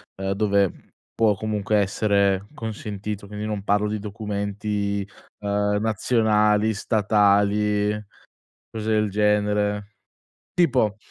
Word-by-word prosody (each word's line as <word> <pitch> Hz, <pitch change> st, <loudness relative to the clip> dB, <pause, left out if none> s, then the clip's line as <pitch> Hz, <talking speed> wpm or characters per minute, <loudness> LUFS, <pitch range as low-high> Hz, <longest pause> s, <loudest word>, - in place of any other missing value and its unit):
ehm, 95 Hz, 0 st, -3 dB
dove 100 Hz, -2 st, +2 dB, 0.4 s
può 110 Hz, -3 st, +3 dB
comunque 105 Hz, 0 st, -1 dB
essere 100 Hz, -1 st, +2 dB
consentito. 105 Hz, -4 st, -5 dB
Quindi 105 Hz, +1 st, -6 dB
non 105 Hz, -2 st, -3 dB
parlo 105 Hz, +1 st, +2 dB
di 105 Hz, 0 st, -2 dB
documenti, 100 Hz, -1 st, -3 dB, 0.3 s
ehm, 105 Hz, 0 st, 0 dB
nazionali, 110 Hz, -1 st, +2 dB
statali, 105 Hz, 0 st, +2 dB, 0.8 s
cose 110 Hz, -1 st, -5 dB
del 105 Hz, -1 st, +2 dB
genere. 105 Hz, 0 st, +1 dB, 0.7 s
Tipo 125 Hz, -, +2 dB
105 Hz, 95 wpm, -23 LUFS, 100-105 Hz, 0.8 s, può